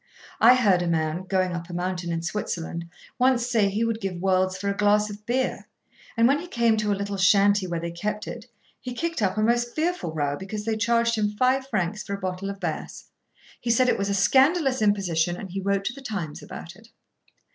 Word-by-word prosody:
I 245 +3 +8
heard 200 -8 +3
a 175 - -1
man, 160 +2 -1
going 185 -1 0
up 170 0 -6
a - - -7
mountain 175 -1 -2
in 165 0 -2
Switzerland, 170 -3 -4 0.3
once 250 -1 +3
say 225 -5 +2
he 210 +3 -1
would 230 0 -2
give 195 -2 -3
worlds 185 0 +1
for 200 +1 -4
a 200 - 0
glass 210 +1 +2
of 205 +1 -11
beer, 255 +2 -1 0.5
and, 230 0 +5
when 280 +3 +3
he 350 - -8
came 235 -7 +2
to 210 -1 0
a 200 - 0
little 200 0 -3
shanty 200 +1 +4
where 170 -1 -2
they 170 0 -4
kept 210 +5 -4
it, 235 0 -7 0.3
he 250 -1 -7
kicked 335 -1 -2
up 195 0 0
a 215 - +2
most 240 +1 +1
fearful 330 - -1
row 145 -2 -1
because 205 +5 -6
they 225 -1 0
charged 230 +2 +2
him 215 -2 +1
five 255 +5 +1
francs 210 -3 -1
for 200 - -4
a - - -8
bottle 185 +1 -4
of 200 0 -6
Bass. 165 -5 -5 0.5
He 240 - -4
said 250 +2 +4
it - - +2
was 200 0 -1
a 200 - +1
scandalous 270 - +3
imposition, 180 -5 +1
and 190 -2 -8
he 195 +1 -3
wrote 195 0 0
to 240 - -1
the 275 - -11
Times 195 - -5
about 170 +1 -9
it. 220 +3 -18
205 Hz, 225 wpm, -25 LUFS, 185-235 Hz, 0.5 s, I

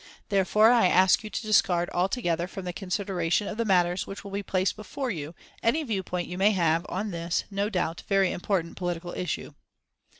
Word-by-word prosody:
Therefore, 210 +3 +4
I 235 -6 +5
ask 185 +3 +4
you 215 - -6
to - - -3
discard 180 -5 +3
altogether 175 -3 0
from 190 0 -8
the 180 - -3
consideration 190 -1 -1
of 215 - -5
the 230 - 0
matters 180 -2 +2
which 195 - -7
will 200 - -9
be 200 +1 -2
placed 190 -1 0
before 245 +5 -4
you 160 -2 -6 0.3
any 300 +8 +2
viewpoint 190 - -3
you 180 +1 -6
may 205 +2 +4
have 170 -2 +1
on 200 +3 -3
this 170 0 -1
no 200 +1 -1
doubt 175 -5 -2
very 195 -2 +3
important 175 -2 -2
political 175 -1 -3
issue." 180 -3 -4
190 Hz, 190 wpm, -27 LUFS, 175-205 Hz, 0.3 s, I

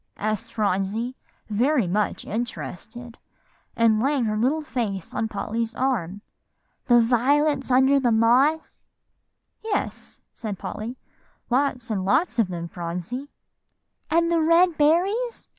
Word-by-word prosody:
asked 215 +2 -3
Phronsie, 210 +4 -1 0.3
very 245 +3 +2
much 205 +4 -1
interested, 235 +1 -6 0.6
and 225 -2 +3
laying 275 -1 +1
her 215 -1 -1
little 270 +8 +1
face 215 - -4
on 220 - -1
Polly's 225 +2 -3
arm, 205 -8 -1 0.7
"the 240 - +5
little 235 -1 +5
violets 275 +3 +2
under 265 +2 +4
the 245 -3 +1
moss?" 250 +8 +2 0.8
"Yes," 440 -2 -3
said 210 -4 -5
Polly, 230 +7 -6 0.5
"lots 250 -3 0
and 195 -3 -1
lots 240 - +1
of 225 - +3
them, 170 -2 -5
Phronsie." 180 - -5 0.8
"And 335 +1 +2
the 335 -1 +3
red 335 +2 +4
berries?" 375 +11 +1
240 Hz, 125 wpm, -24 LUFS, 215-285 Hz, 0.8 s, the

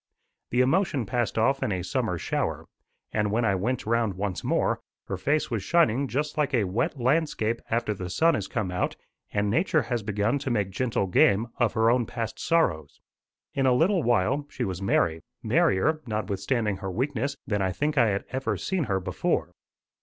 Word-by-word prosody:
The 125 - +2
emotion 140 - +2
passed 120 +3 -1
off 135 +5 +2
in - - 0
a 90 -2 -2
summer 90 - -1
shower, - - -2 0.5
and 105 -1 0
when 115 +2 +1
I 100 - +3
went 115 +7 -1
round 115 -3 +1
once 95 -4 -3
more, - - +1 0.3
her 100 - -3
face 145 +11 0
was 115 -4 -1
shining 140 - +2
just 150 +4 -2
like 145 -2 +1
a 115 - +3
wet 105 +8 -1
landscape 125 -4 +1
after 115 -1 0
the 95 -2 -6
sun 165 - +3
has - - -2
come 105 -7 -2
out 90 - -1 0.4
and 105 0 0
Nature 155 - +2
has 120 -2 -2
begun 105 +5 0
to 135 - -3
make 105 -5 0
gentle 115 -1 0
game 100 +4 +3
of 120 -3 +2
her 115 +1 +3
own 120 -2 +1
past 115 -2 -4
sorrows. 85 - 0 0.5
In 135 -1 +1
a 125 - +5
little 175 +8 +3
while, 120 +4 +1
she - - -4
was 95 -1 -3
merry 80 -4 +1 0.2
merrier, 155 +12 +2
notwithstanding 105 +1 -1
her 95 0 -5
weakness, 135 +6 -2
than 105 -3 -1
I 95 -1 +1
think 150 - -1
I 120 -5 +4
had 100 -1 -1
ever 130 +1 -1
seen 185 -6 -1
her 95 -4 0
before. 90 - -1
115 Hz, 190 wpm, -26 LUFS, 100-135 Hz, 0.5 s, a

